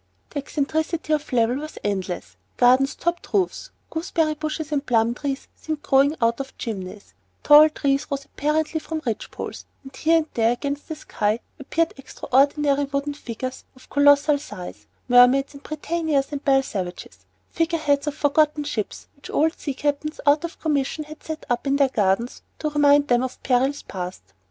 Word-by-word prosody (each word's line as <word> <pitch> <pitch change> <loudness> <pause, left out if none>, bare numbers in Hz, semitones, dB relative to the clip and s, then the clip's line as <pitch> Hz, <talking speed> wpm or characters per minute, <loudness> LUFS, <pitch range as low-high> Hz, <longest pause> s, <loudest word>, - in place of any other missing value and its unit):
The 290 - -3
eccentricity 310 +3 -1
of 300 0 -1
level 240 0 +2
was 305 +2 -7
endless, 190 - -3 0.2
gardens 255 +3 +4
topped 345 0 -3
roofs, 380 -3 0 0.2
gooseberry 320 -1 0
bushes 310 0 -4
and 285 -2 0
plum 230 -3 +2
trees 275 +2 -4
seemed 310 -2 -5
growing 275 +3 +4
out 230 0 +1
of 270 -1 -7
chimneys, 200 -2 -6 0.3
tall 300 +1 +8
trees 280 -2 0
rose 280 -1 -3
apparently 310 +2 -1
from 315 0 -5
ridge 230 -3 -3
poles, - - -7 0.2
and 270 -1 -12
here 325 +4 +3
and 320 - +1
there 230 0 +3
against 280 +3 -4
the 315 - -4
sky 215 -6 -1 0.2
appeared 325 +4 0
extraordinary 280 +2 +1
wooden 280 +1 -2
figures 255 -1 -6
of 260 - -19
colossal 285 +1 +5
size, 185 -9 -9 0.2
Mermaids 250 +3 +5
and 280 - -12
Britannias 310 -2 -1
and 285 -1 -5
Belle 270 -1 +4
Savages, 185 -7 -6 0.2
figure 330 0 0
heads 290 -2 +1
of 295 - -2
forgotten 300 0 +2
ships 235 -8 -4
which 280 - -13
old 315 +2 +2
sea 280 -3 -4
captains 290 +2 -2
out 290 +2 +4
of 340 - -6
commission 300 0 -1
had 305 +1 -12
set 315 0 -6
up 245 +3 -1
in 275 - +2
their 280 -1 +3
gardens 210 +1 0 0.2
to 305 - -2
remind 290 -1 +4
them 245 -2 +3
of 260 0 -5
perils 265 +2 +1
past. 180 - -6
285 Hz, 170 wpm, -23 LUFS, 255-305 Hz, 0.3 s, tall